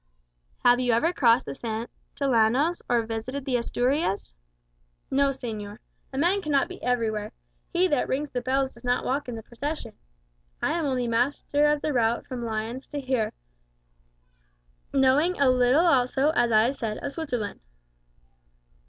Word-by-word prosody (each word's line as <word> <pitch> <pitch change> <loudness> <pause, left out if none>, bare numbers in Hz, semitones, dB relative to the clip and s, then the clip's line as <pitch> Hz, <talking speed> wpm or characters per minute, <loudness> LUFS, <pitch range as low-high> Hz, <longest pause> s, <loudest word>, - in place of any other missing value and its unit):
"Have 245 0 +6
you 245 -2 +2
ever 320 +10 +2
crossed 240 -6 +4
the 140 - -5
Santillanos, 235 - 0
or 240 -1 +3
visited 230 +5 -4
the 260 - 0
Asturias?" 245 - -1 0.8
"No, 275 +1 +3
señor. 220 -6 -5 0.3
A 265 - -6
man 355 +7 +2
cannot 295 -3 +1
be 370 +1 -10
everywhere; 220 -3 -1 0.4
'he 360 +1 +3
that 290 -7 +1
rings 290 +3 -2
the 245 - -2
bells 265 +1 0
does 235 - -17
not 245 0 0
walk 270 +1 -1
in 240 - -4
the 225 - -7
procession.' 270 0 -5 0.7
I - - 0
am 335 -2 -1
only 255 -3 0
master 280 +5 +1
of 295 -1 +1
the 305 - 0
route 235 -1 +1
from 250 -3 -5
Lyons 225 +3 -4
here; 260 -6 -1 1.6
knowing 280 +6 +3
a 275 -2 +5
little 255 +6 +4
also, 270 -1 +3
as 240 -6 +2
I 215 0 +5
have 255 +4 0
said, 215 -2 -3
of - - -5
Switzerland." 250 -10 -4
255 Hz, 155 wpm, -26 LUFS, 230-285 Hz, 1.6 s, Have